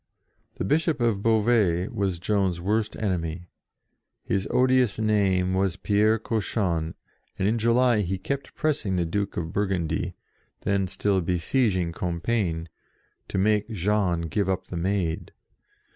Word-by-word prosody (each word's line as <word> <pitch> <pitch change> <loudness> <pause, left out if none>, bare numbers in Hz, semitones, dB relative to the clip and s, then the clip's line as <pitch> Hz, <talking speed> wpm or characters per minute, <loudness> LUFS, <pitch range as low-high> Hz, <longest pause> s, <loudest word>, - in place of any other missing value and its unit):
The - - -3
Bishop 155 - +1
of 115 -5 +1
Beauvais 105 -5 +2
was 95 -3 -1
Joan's 95 -1 0
worst 105 +4 0
enemy: 90 -4 -2 0.8
his 95 +1 -1
odious 125 -4 +3
name 100 -4 +2
was 95 -2 +1
Pierre 105 +3 +2
Cauchon, 95 -7 -1 0.4
and 95 - +1
in 115 +2 +1
July 115 0 +3
he 95 0 -2
kept 140 +7 -4
pressing 150 - 0
the 90 -1 +1
Duke 100 +4 -2
of 85 +1 -3
Bur 100 0 +1
gundy, 90 -4 -2 0.5
then 100 -1 +1
still 95 +1 0
besieging 90 +1 +1
Compiegne, 85 0 -1 0.6
to - - -3
make 105 +2 +2
Jean 100 -4 +1
give 95 +4 -1
up 95 - -2
the - - -5
Maid. 90 -1 -1
100 Hz, 135 wpm, -26 LUFS, 90-110 Hz, 0.8 s, odious